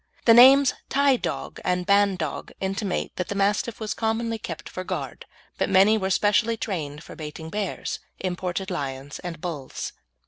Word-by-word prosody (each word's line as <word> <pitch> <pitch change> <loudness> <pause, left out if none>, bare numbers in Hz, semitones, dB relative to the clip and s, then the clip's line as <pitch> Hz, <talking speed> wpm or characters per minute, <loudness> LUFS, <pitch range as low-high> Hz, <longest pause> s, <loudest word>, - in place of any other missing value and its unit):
The 230 - +8
names 265 +3 +8 0.2
Tie 280 -1 +4
dog - - -4
and 180 0 0
Bandog 200 -5 +1
intimate 195 0 -2
that 180 - -2
the 205 - -4
Mastiff 205 +3 0
was 215 -1 -2
commonly 225 0 -1
kept 165 -4 -6
for 185 - -6
guard, - - -5 0.3
but - - +1
many 195 +3 +6
were 190 -3 -1
specially 210 +4 +2
trained 155 -9 -4
for - - -11
baiting 160 +1 -7
bears, 205 -2 -3 0.2
imported 185 +1 -3
lions, 140 -3 -4
and 170 -2 -6
bulls. 155 -6 -5
190 Hz, 160 wpm, -25 LUFS, 170-220 Hz, 0.3 s, The